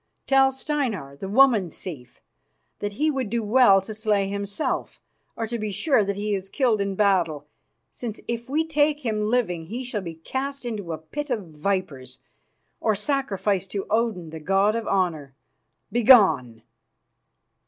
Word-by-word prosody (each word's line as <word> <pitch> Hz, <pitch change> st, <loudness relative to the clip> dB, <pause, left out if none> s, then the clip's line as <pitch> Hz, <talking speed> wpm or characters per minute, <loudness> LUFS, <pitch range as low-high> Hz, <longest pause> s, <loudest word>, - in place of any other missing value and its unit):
Tell 270 Hz, 0 st, +5 dB
Steinar, 255 Hz, -, -3 dB
the 190 Hz, -, -6 dB
woman 220 Hz, -5 st, +5 dB
thief, 150 Hz, -7 st, -10 dB, 0.6 s
that 205 Hz, 0 st, -3 dB
he 305 Hz, +8 st, +1 dB
would 265 Hz, -6 st, -2 dB
do 235 Hz, 0 st, -1 dB
well 210 Hz, -3 st, +5 dB
to 215 Hz, +3 st, -7 dB
slay 210 Hz, -2 st, +1 dB
himself, 200 Hz, +6 st, -3 dB, 0.4 s
or 225 Hz, -, -2 dB
to 235 Hz, +1 st, -4 dB
be 215 Hz, 0 st, -2 dB
sure 245 Hz, +3 st, +2 dB
that 200 Hz, 0 st, -2 dB
he 205 Hz, +1 st, -2 dB
is 195 Hz, -1 st, -3 dB
killed 230 Hz, -3 st, +1 dB
in 200 Hz, -1 st, -2 dB
battle, 175 Hz, -8 st, +1 dB, 0.5 s
since 225 Hz, -3 st, -6 dB
if 235 Hz, +1 st, -4 dB
we 310 Hz, +4 st, +1 dB
take 300 Hz, -1 st, +1 dB
him 220 Hz, -5 st, -1 dB
living 210 Hz, -7 st, 0 dB
he 235 Hz, +9 st, -5 dB
shall 240 Hz, -4 st, -3 dB
be 170 Hz, -3 st, -7 dB
cast 265 Hz, -, -5 dB
into 210 Hz, -7 st, -4 dB
a 160 Hz, -, -3 dB
pit 290 Hz, -, -6 dB
of 215 Hz, -9 st, -3 dB
vipers 150 Hz, -6 st, -3 dB, 0.6 s
or 220 Hz, -2 st, +1 dB
sacrificed 205 Hz, -5 st, -1 dB
to 195 Hz, -1 st, -3 dB
Odin, 215 Hz, -8 st, 0 dB
the 160 Hz, -, -7 dB
god 195 Hz, +6 st, +2 dB
of 230 Hz, -2 st, -3 dB
honour. 160 Hz, -8 st, -1 dB, 0.6 s
Begone!" 160 Hz, -, +5 dB
210 Hz, 160 wpm, -24 LUFS, 185-245 Hz, 0.6 s, Tell